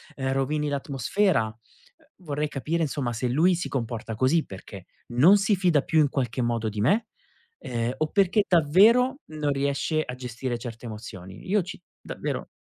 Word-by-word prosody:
uhm, 135 -1 -2
rovini 150 +2 0
l'atmosfera. 140 - +1
Uhm, 310 - -19
vorrei 150 0 -1
capire 155 +4 -2
insomma 135 -4 -2
se 125 +2 -2
lui 165 +8 +3
si 175 - -3
comporta 115 -3 -4
così 130 +7 +2
perché 95 0 -10 0.2
non 150 +12 +6
si 200 0 +2
fida 175 -6 +3
più 160 +1 +1
in 150 - +5
qualche 125 -3 -2
modo 115 -2 0
di 105 0 -6
me, 205 - +2 0.5
uhm, 120 0 -2
o 155 - 0
perché 200 +1 +3
davvero 215 - +4
non 150 -2 -1
riesce 140 +3 0
a 125 - -6
gestire 125 0 -4
certe 115 0 -8
emozioni. 100 -4 -9
Io 205 0 +3
ci 180 +1 -8 0.2
davvero - - -4
140 Hz, 165 wpm, -26 LUFS, 120-175 Hz, 0.5 s, non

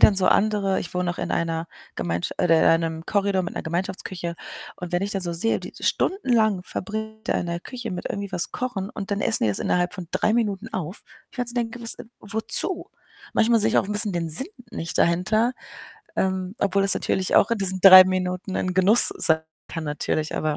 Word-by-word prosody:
dann 210 - +7
so 190 -1 +2
andere, 200 -2 +2
ich - - -7
wohne 180 -1 -1
auch 175 - -6
in - - -3
einer 165 0 -2 0.3
Gemeinsch 85 0 -2
oder 165 -2 +4
in 165 +1 +4
einem 160 0 -5
Korridor 200 -2 +1
mit 175 - -6
'ner - - -4
Gemeinschaftsküche 175 0 -4 0.4
und 180 -1 -7
wenn 175 - +1
ich 205 - -2
dann 195 - -2
so 175 -1 -2
sehe, 200 +7 0
die - - -9
stundenlang 225 - +1
verbringt 220 +3 -6
da - - +2
in 175 - -1
der 170 0 -3
Küche 240 +1 -7
mit 180 -1 -5
irgendwie 200 -1 -5
was 175 -2 -2
kochen 220 -6 -4
und 195 - -7
dann 200 0 -1
essen 220 - +2
die 110 - +2
das 100 - -2
innerhalb 180 0 0
von 180 -2 -7
3 215 - +1
Minuten 210 -5 -1
auf. 180 +2 -5 0.3
Ich - - -18
kann 245 -1 -2
so 240 - -3
denken: 240 0 -3
„Was 230 - -2
äh, - - -10 0.2
wozu?“ 220 - -1 0.5
Manchmal 230 0 +4
sehe - - +4
ich - - +3
auch - - +1
'n 210 - -3
bisschen 205 -1 +1
den 170 -1 -2
Sinn 260 - -2 0.2
nicht 165 -5 -5
dahinter, 215 +8 +2 0.6
ähm, 190 0 -1
obwohl 195 0 +1
das 195 - +4
natürlich 190 -1 0
auch - - +5
in 225 - 0
diesen 190 -1 -2
3 185 0 +11
Minuten 185 0 -2
ein 185 -1 -2
Genuss 195 +5 +7
sein 160 0 +3 0.3
kann 165 -1 -5
natürlich, 150 +1 -2
aber 155 -1 -1
190 Hz, 220 wpm, -24 LUFS, 175-215 Hz, 0.6 s, 3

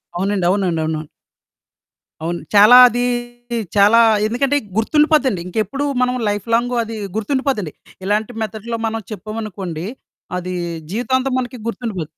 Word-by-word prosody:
అవునండి. 190 0 0
అవునండి. 195 0 +1
అవునవును. 155 -1 -2 1.2
అవును. 170 +1 -2 0.2
చాలా 215 +5 +9
అది 245 +1 -1 0.7
చాలా 210 +4 +6 0.3
ఎందుకంటే 275 +5 +1 0.2
గుర్తుండిపోద్దండి. 280 - +2
ఇంకెప్పుడు 220 +9 -2 0.2
మనం 250 0 +1
లైఫ్‌లాంగు 230 +4 0
అది 225 0 -7 0.2
గుర్తుండిపోద్దండి. 220 - -1 0.3
ఇలాంటి 210 +3 0
మెథడ్‌లో 220 +2 -5
మనం 225 0 -3
చెప్పామనుకోండి. 200 -5 -5 0.5
అది 180 0 -4 0.4
జీవితాంతం 260 +4 0
మనకి 250 0 -5
గుర్తుండిపో 220 -5 -3
220 Hz, 110 wpm, -19 LUFS, 195-245 Hz, 1.2 s, చాలా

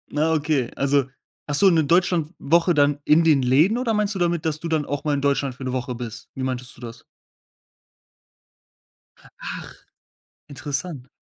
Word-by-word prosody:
Ah, 155 +2 +2
okay. 145 -5 0
Also, 140 -1 +2 0.4
hast 145 -1 +1
du 195 - +7
'ne 165 -3 +3
Deutschlandwoche 170 0 +2
dann 145 -1 +2
in 155 +3 +5
den 155 -4 +4
Läden 145 - +3
oder 245 -2 0
meinst 210 -1 0
du - - -3
damit, 170 -2 0
dass 155 -1 -1
du 170 - -5
dann 160 -3 0
auch 145 0 -4
mal 150 -2 0
in 140 - -1
Deutschland 140 -2 0
für 135 - -10
'ne 130 -1 -3
Woche 125 0 -3
bist? 115 -1 -8
Wie 135 - -4
meintest 130 -1 -4
du - - -16
das? 115 0 -9 2.4
Ach, - - -7 0.7
interessant. 145 -1 -5
145 Hz, 170 wpm, -23 LUFS, 135-165 Hz, 2.4 s, du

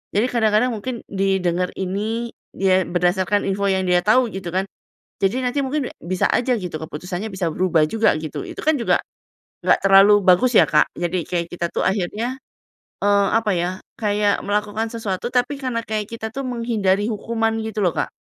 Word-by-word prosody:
Jadi 220 +5 +3
kadang-kadang 225 +1 +2
mungkin 240 +2 -5
didengar 185 -2 0
ini, 215 +5 -2 0.2
dia 190 -1 +2
berdasarkan 180 +3 +1
info 200 +1 -1
yang 190 0 +1
dia 180 0 +4
tau 240 +2 +4
gitu 190 -3 -6
kan? 190 +1 0 0.6
Jadi 235 +7 +1
nanti 250 +3 0
mungkin 275 0 -1
bi - - -11 0.3
bisa - - +2
aja 250 +1 +2
gitu 180 -6 -5
keputusannya 175 +6 -5
bisa 185 -3 -1
berubah 170 -4 +2
juga 225 -4 +2
gitu, 155 -2 -5
itu - - -7
kan 310 -1 +3
juga - - +2 0.7
nggak - - +4
terlalu 195 +1 +7
bagus 185 +7 +4
ya - - +6
Kak? 150 0 +3
Jadi 175 0 -2
kayak 170 -1 -1
kita 175 -1 -2
tuh - - -1
akhirnya, 215 +7 -1 0.7
eee, 200 -1 +3
apa 220 -2 -1
ya, 175 +1 0 0.3
kayak 205 -1 +1
melakukan 210 +2 -1
sesuatu 210 -2 -3
tapi 250 +3 +1
karena 245 -3 -2
kayak 215 -1 -3
kita 225 -1 -5
tuh 275 - -3
menghindari 220 -5 0
hukuman 225 +1 -1
gitu 215 -1 -4
loh 175 - +3
Kak, - - -2
205 Hz, 180 wpm, -21 LUFS, 185-230 Hz, 0.7 s, terlalu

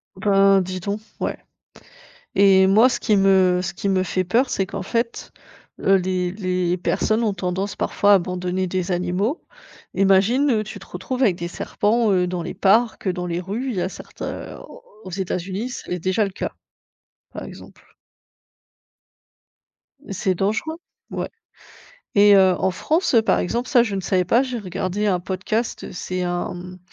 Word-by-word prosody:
Ben, 195 0 +4
dis 185 0 -4
donc, 200 +3 -3 0.2
ouais - - -2 1.0
et 190 -1 +6
moi, 215 +6 +6
ce - - -2
qui 215 -3 +2
me 190 -2 +4
ce 175 -1 -3
qui 200 - -3
me 190 -1 +2
fait 185 0 -1
peur, 240 +9 +1
c'est 195 - 0
qu'en 195 +1 -5
fait, 230 +4 -3 0.5
heu, 195 - +4
les 180 -1 -1
les 180 -3 -1
personnes 215 +5 0
ont 210 - +1
tendance 185 +2 -3
parfois 205 0 +2
à - - +9
abandonner 180 +1 -2
des 185 0 -2
animaux. 180 - -1 0.5
Imagine, 195 +9 +3
heu, 215 -3 +2
tu 215 -1 -8
te - - -14
retrouves 250 +9 -4
avec 195 -8 +3
des 170 0 -4
serpents, 215 +4 0
heu, 180 -1 +2
dans 180 -1 -3
les 180 +3 -6
parcs, 210 +2 +2
dans 180 -1 -2
les 170 0 -2
rues, 215 +9 -4
il 230 - -4
y 180 - 0
a 180 - -1
certains, - - -9 0.3
heu, - - -13
aux - - -13 0.2
aux 185 - -8
États-Unis, 190 +4 -3
c'est 245 - -7
l 180 - -2
déjà 185 +5 +1
le 195 - -3
cas, - - -4 0.8
par - - -7
exemple. - - -12 2.3
C'est 190 -1 -1
dangereux, 220 - -1 0.3
ouais - - -3 0.9
et 205 0 +7
heu, 190 -1 +6
en 190 - +1
France, 315 - 0
heu, 230 - +6
par 220 - +2
exemple, 235 +7 -2
ça, 245 -3 +5
je 215 -4 -4
ne 195 - -2
savais 185 -1 +1
pas. 235 +8 +4
J'ai 255 -2 -3
regardé 190 0 -3
un 185 -3 +2
podcast, 195 +6 -3
c'est 185 0 -4
un, 175 +1 -2
mmh, 180 +1 -9
190 Hz, 180 wpm, -22 LUFS, 180-215 Hz, 2.3 s, à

